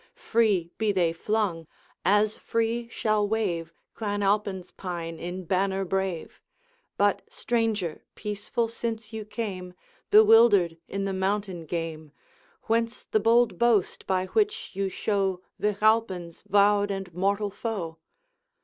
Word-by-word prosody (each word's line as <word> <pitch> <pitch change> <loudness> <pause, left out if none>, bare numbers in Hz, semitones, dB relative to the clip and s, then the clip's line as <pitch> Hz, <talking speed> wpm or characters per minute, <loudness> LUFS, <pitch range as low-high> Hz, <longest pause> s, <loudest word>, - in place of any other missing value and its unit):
Free 210 - +1
be 220 -1 +2
they 175 -4 +2
flung! 180 -3 -1 0.4
as 210 +3 +3
free 230 +1 -1
shall 215 -2 +1
wave 175 -7 -1 0.2
Clan 205 -2 -2
Alpine's 195 -2 0
pine 170 -3 -5
in 180 +2 -5
banner 190 +2 0
brave. 190 -2 -3 0.6
But, 205 0 +2
stranger, 220 -8 -1
peaceful 210 +2 -2
since 225 -1 -5
you 220 -1 -5
came, 190 -5 -5 0.3
Bewildered 210 -6 +6
in 195 0 -3
the 195 - -1
mountain 190 -3 -2
game, 160 -2 -4 0.5
Whence 230 +1 0
the 215 - +1
bold 230 +3 +3
boast 235 -5 +2
by 185 -1 +1
which 420 - 0
you 195 0 -1
show 190 -2 -1 0.2
Vich 210 0 -1
Alpine's 195 -7 +1
vowed 205 0 +4
and 195 -3 -4
mortal 200 +3 0
foe?' 190 -7 -4
200 Hz, 125 wpm, -27 LUFS, 180-220 Hz, 0.6 s, Bewildered